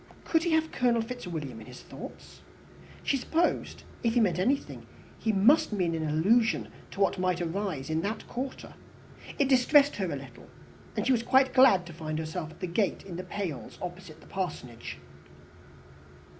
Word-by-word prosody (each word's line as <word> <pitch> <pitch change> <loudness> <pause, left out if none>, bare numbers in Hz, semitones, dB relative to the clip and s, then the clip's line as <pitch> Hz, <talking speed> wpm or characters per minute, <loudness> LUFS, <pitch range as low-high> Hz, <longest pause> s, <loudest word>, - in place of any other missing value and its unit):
Could 325 - +2
he 340 -1 0
have 320 0 +2
Colonel 240 -2 +2
Fitzwilliam 170 - -6
in - - -12
his - - -11
thoughts? - - -11 0.6
She 275 - +1
supposed, 325 +6 0 0.2
if 230 0 +1
he - - +5
meant 180 -6 +2
anything, 265 +9 -1 0.3
he 220 - +1
must 270 +11 +4
mean 180 -5 0
an 160 -1 -1
allusion 215 +10 +3 0.2
to - - -10
what 195 -1 +2
might 180 -1 +1
arise 170 -5 -2
in 160 0 0
that 215 +4 -4
quarter. 260 +2 -5 0.6
It 280 - +3
distressed 275 +2 +5
her 190 -4 -1
a - - -2
little, 130 -3 -11 0.5
and - - 0
she - - +3
was 240 -3 +3
quite 265 +2 +4
glad 255 -9 +6
to 170 - -10
find 155 -1 -4
herself 160 +1 -4
at 160 - -16
the - - -1
gate 185 +3 0
in 185 -3 -7
the 180 - -4
pales 180 -6 -5
opposite 175 -3 -8
the - - -16
Parsonage. 125 - -5
190 Hz, 175 wpm, -29 LUFS, 165-250 Hz, 0.6 s, glad